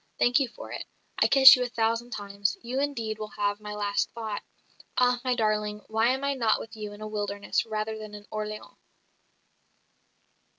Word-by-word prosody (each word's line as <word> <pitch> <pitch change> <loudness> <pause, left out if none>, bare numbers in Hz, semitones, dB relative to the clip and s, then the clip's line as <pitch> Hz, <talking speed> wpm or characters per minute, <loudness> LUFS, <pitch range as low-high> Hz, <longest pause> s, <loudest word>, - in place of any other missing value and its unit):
Thank 245 +3 +4
you 270 - +1
for 235 - -11
it. - - -5 0.4
I - - +6
kiss 270 -1 +10
you 250 - -3
a 250 - 0
thousand 230 0 0
times. 200 -3 -2
You 250 +3 -2
indeed 230 -7 -2
will 215 -1 -6
have 205 0 0
my 210 0 -7
last 205 -1 0
thought. 220 -3 -4 0.6
Ah, 250 -1 +3
my 255 -1 +1
darling, 210 -2 0
why 220 +1 +2
am 260 +2 0
I 280 0 +1
not 230 -5 +2
with 225 - -9
you 210 -1 -6
in 205 +1 -11
a 215 - -5
wilderness 205 +1 -2
rather 215 0 -2
than 215 -1 -8
in 205 0 -11
Orleans?" 215 0 -6
220 Hz, 185 wpm, -27 LUFS, 210-245 Hz, 0.6 s, kiss